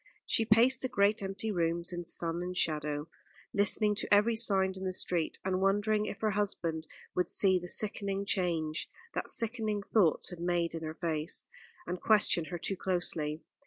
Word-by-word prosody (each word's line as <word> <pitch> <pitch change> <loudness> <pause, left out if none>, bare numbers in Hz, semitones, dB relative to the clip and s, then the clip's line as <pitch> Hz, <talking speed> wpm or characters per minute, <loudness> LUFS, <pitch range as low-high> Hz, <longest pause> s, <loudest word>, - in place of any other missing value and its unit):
She 225 - +2
paced 230 +5 +4
the 260 - -1
great 205 +1 +2
empty 195 +3 -3
rooms 170 -1 -1
in 175 0 -4
sun 170 0 -1
and 180 0 -4
shadow, 150 -2 0 0.5
listening 210 +1 +3
to - - -4
every 210 +3 +5
sound 195 -4 +2
in 190 - -7
the 185 -1 -2
street, 175 -3 -1
and 185 0 0
wondering 210 +2 +2
if - - -6
her 215 -1 +1
husband 170 -6 -2 0.3
would 180 -1 0
see 190 -2 +4
the 175 - -8
sickening 200 0 0
change 165 -5 -1 0.2
that - - -3
sickening 220 -3 -1
thoughts 190 -5 +2
had 175 - -8
made 175 -1 0
in 165 - -5
her 155 0 -5
face, 160 -2 -2 0.4
and 180 +1 -4
question 210 -6 +3
her 175 +1 -5
too 195 +3 -1
closely. 165 -4 -2
185 Hz, 175 wpm, -31 LUFS, 170-205 Hz, 0.5 s, every